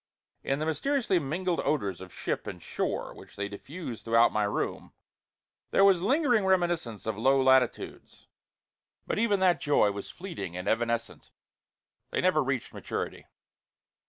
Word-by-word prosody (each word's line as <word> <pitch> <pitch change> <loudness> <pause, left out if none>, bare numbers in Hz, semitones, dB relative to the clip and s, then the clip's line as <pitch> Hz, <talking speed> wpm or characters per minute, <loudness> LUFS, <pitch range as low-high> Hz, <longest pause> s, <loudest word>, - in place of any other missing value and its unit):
In 135 - 0
the 155 - -2
mysteriously 220 - +1
mingled 170 +4 -1
odors 100 - -1
of 95 -1 -10
ship - - -3
and - - -6
shore - - -3
which - - -14
they 100 0 -3
diffused 125 - -8
throughout 115 +1 +4
my 105 -1 +2
room, 100 - -3 0.8
there 195 - +5
was 190 -3 +5
lingering 245 - +3
reminiscence 175 - 0
of 110 -1 -3
low 135 +3 +4
latitudes. 130 -2 +1 0.8
But - - -1
even 210 -3 +2
that 180 -2 +3
joy 145 -8 +3
was 100 0 -7
fleeting 100 - -6
and 90 - -5
evanescent: 115 0 -1 0.8
they - - -1
never 180 -5 +3
reached 135 -2 -2
maturity. - - -5
140 Hz, 145 wpm, -29 LUFS, 115-185 Hz, 0.8 s, there